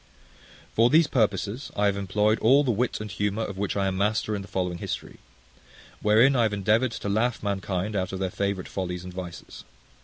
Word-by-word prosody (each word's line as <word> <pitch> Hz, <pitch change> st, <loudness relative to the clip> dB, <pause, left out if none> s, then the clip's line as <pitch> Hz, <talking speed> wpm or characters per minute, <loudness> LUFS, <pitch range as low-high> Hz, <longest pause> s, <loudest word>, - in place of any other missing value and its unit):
For 115 Hz, +2 st, +4 dB
these 160 Hz, +4 st, +5 dB
purposes 110 Hz, 0 st, -1 dB
I 105 Hz, -, +1 dB
have 100 Hz, -1 st, +2 dB
employed 105 Hz, +2 st, +1 dB
all 135 Hz, +6 st, +5 dB
the 130 Hz, -, +1 dB
wit 120 Hz, +3 st, -1 dB
and 105 Hz, -1 st, -6 dB
humour 105 Hz, +3 st, -1 dB
of 100 Hz, -3 st, -6 dB
which 100 Hz, 0 st, -1 dB
I 100 Hz, -, +1 dB
am 95 Hz, -1 st, -1 dB
master 105 Hz, +2 st, 0 dB
in 100 Hz, -, -4 dB
the 100 Hz, -, -10 dB
following 90 Hz, -3 st, -2 dB
history; -, -, -6 dB, 0.8 s
wherein 115 Hz, +6 st, +5 dB
I 120 Hz, -, +3 dB
have 110 Hz, -2 st, +2 dB
endeavoured 110 Hz, +5 st, +2 dB
to -, -, -5 dB
laugh 110 Hz, +4 st, 0 dB
mankind 100 Hz, 0 st, -2 dB
out 95 Hz, -2 st, -1 dB
of 95 Hz, -, -4 dB
their 95 Hz, -1 st, -2 dB
favourite 100 Hz, -1 st, -2 dB
follies 90 Hz, -2 st, -4 dB
and 90 Hz, 0 st, -8 dB
vices. 90 Hz, -2 st, -8 dB
100 Hz, 205 wpm, -26 LUFS, 95-110 Hz, 0.8 s, these